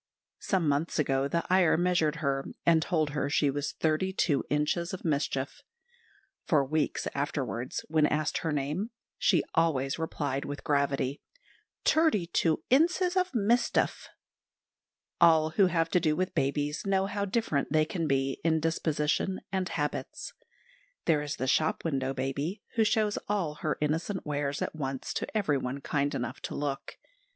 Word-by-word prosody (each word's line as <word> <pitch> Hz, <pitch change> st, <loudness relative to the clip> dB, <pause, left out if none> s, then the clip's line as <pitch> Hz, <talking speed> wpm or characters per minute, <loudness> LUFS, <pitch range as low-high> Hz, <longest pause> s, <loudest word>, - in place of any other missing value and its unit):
Some 185 Hz, -5 st, 0 dB
months 145 Hz, +4 st, 0 dB
ago, 135 Hz, -2 st, +1 dB
the 170 Hz, +4 st, 0 dB
Iyer 185 Hz, -3 st, +4 dB
measured 175 Hz, -3 st, +2 dB
her, 135 Hz, 0 st, 0 dB, 0.2 s
and 165 Hz, -1 st, +5 dB
told 155 Hz, -3 st, 0 dB
her 145 Hz, -1 st, -1 dB
she 145 Hz, -1 st, +2 dB
was 145 Hz, +1 st, -3 dB
thirty 160 Hz, +4 st, 0 dB
two 155 Hz, -7 st, +1 dB
inches 150 Hz, +4 st, 0 dB
of 180 Hz, -, -12 dB
mischief. 140 Hz, -, -1 dB, 0.8 s
For 150 Hz, -7 st, +2 dB
weeks 155 Hz, +2 st, -1 dB
afterwards, 135 Hz, -3 st, -3 dB
when 155 Hz, -1 st, +3 dB
asked 155 Hz, +1 st, 0 dB
her 160 Hz, -, -2 dB
name, 150 Hz, +9 st, -2 dB, 0.3 s
she 175 Hz, -6 st, +3 dB
always 145 Hz, -4 st, +1 dB
replied 145 Hz, -4 st, -2 dB
with 145 Hz, 0 st, -6 dB
gravity, 140 Hz, -1 st, 0 dB, 0.6 s
"Terty 315 Hz, -, +3 dB
two 160 Hz, -2 st, +2 dB
inses 355 Hz, +6 st, +3 dB
of 370 Hz, 0 st, +1 dB
mistef." 235 Hz, +1 st, +1 dB, 1.1 s
All 160 Hz, -2 st, +5 dB
who 190 Hz, +3 st, +4 dB
have 165 Hz, -2 st, +1 dB
to 180 Hz, -, +4 dB
do 155 Hz, -3 st, +1 dB
with 185 Hz, +2 st, -1 dB
babies 145 Hz, -1 st, -1 dB
know 195 Hz, -1 st, +1 dB
how 200 Hz, 0 st, -2 dB
different 195 Hz, -10 st, -1 dB
they 155 Hz, 0 st, +4 dB
can 165 Hz, 0 st, -2 dB
be 135 Hz, -1 st, 0 dB
in 160 Hz, -1 st, +3 dB
disposition 160 Hz, +3 st, 0 dB
and 190 Hz, -2 st, -1 dB
habits. 150 Hz, -2 st, -3 dB, 0.7 s
There 155 Hz, -3 st, +3 dB
is 150 Hz, 0 st, -3 dB
the 130 Hz, -, -3 dB
shop 155 Hz, +6 st, +1 dB
window 135 Hz, -4 st, 0 dB
baby, 140 Hz, +9 st, -3 dB
who 225 Hz, -, +3 dB
shows 215 Hz, -1 st, +1 dB
all 190 Hz, -7 st, 0 dB
her 155 Hz, -, -1 dB
innocent 160 Hz, +6 st, -1 dB
wares 145 Hz, -1 st, -1 dB
at -, -, -4 dB
once 135 Hz, -3 st, -4 dB
to -, -, -2 dB
everyone 140 Hz, -8 st, 0 dB
kind 145 Hz, 0 st, -1 dB
enough 125 Hz, +2 st, -4 dB
to -, -, -5 dB
look. 140 Hz, -1 st, -4 dB
155 Hz, 155 wpm, -29 LUFS, 140-180 Hz, 1.1 s, and